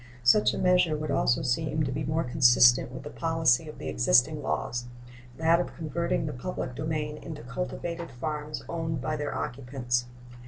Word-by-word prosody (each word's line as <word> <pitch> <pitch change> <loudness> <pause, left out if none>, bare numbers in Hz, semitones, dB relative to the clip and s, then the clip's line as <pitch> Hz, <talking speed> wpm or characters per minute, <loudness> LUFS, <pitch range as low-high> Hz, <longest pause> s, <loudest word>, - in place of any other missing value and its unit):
Such 165 +13 +5
a - - -4
measure 180 -4 +3
would 155 -1 -3
also 120 - +2
seem 150 +4 0
to 135 - -2
be 150 - -3
more 155 +3 0
consistent 125 -1 +5
with 130 - -8
the 145 - -8
policy 165 -3 +1
of - - -10
the - - -7
existing - - +3
laws 120 0 -2 0.5
that 165 +1 +3
of 175 - -4
converting 165 +1 -2
the 150 - -3
public 125 -1 -5
domain 150 +1 -3
into 155 -5 -8
cultivated 170 +5 -5
farms 150 +4 -5
owned 160 -3 -3
by 155 +4 -2
their 150 -1 -3
occupants. 125 -1 -2
150 Hz, 170 wpm, -28 LUFS, 125-160 Hz, 0.5 s, Such